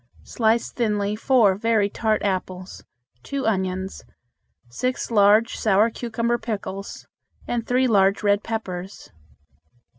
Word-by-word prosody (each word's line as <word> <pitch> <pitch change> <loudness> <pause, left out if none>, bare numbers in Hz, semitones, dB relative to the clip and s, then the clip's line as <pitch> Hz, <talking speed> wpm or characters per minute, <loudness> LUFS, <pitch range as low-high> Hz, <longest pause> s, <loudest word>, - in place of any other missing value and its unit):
Slice 225 0 0
thinly 210 -3 -1
four 225 -3 +3
very 215 0 +1
tart 215 +1 -1
apples, 185 -1 -4 0.4
two 275 - -4
onions, 190 -2 -2 0.6
six 250 - -3
large 210 +1 +4
sour 215 +2 +3
cucumber 235 +1 -2
pickles, 200 -3 -6 0.4
and 235 -1 -2
three 255 +1 +2
large 200 -3 +3
red 205 0 +2
peppers. 195 -4 -6
215 Hz, 110 wpm, -23 LUFS, 195-230 Hz, 0.6 s, large